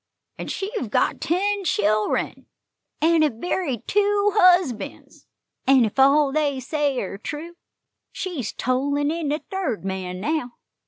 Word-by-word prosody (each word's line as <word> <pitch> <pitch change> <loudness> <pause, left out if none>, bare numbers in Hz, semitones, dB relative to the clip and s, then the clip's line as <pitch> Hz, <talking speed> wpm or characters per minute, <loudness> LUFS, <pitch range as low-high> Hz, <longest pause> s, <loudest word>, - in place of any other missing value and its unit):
An' - - -5
she 390 +2 -4
hev - - -3
got - - +1
ten 400 +4 0
chil'ren, 215 - 0 0.5
an' 325 +1 +4
hev 280 -8 +1
buried 275 - -2
two 410 0 +2
husbands; 360 - +2 0.4
an' 265 -3 +6
ef 220 +5 -4
all 280 +1 +5
they 290 -2 0
say 285 +1 -1
air 195 -3 -4
true, 315 +9 -7 0.6
she's 335 - -4
tollin' 285 +3 0
in 325 -3 -2
the 300 +2 -2
third 370 - -2
man 185 -1 -4
now. 250 +2 -2
295 Hz, 140 wpm, -23 LUFS, 245-350 Hz, 0.6 s, an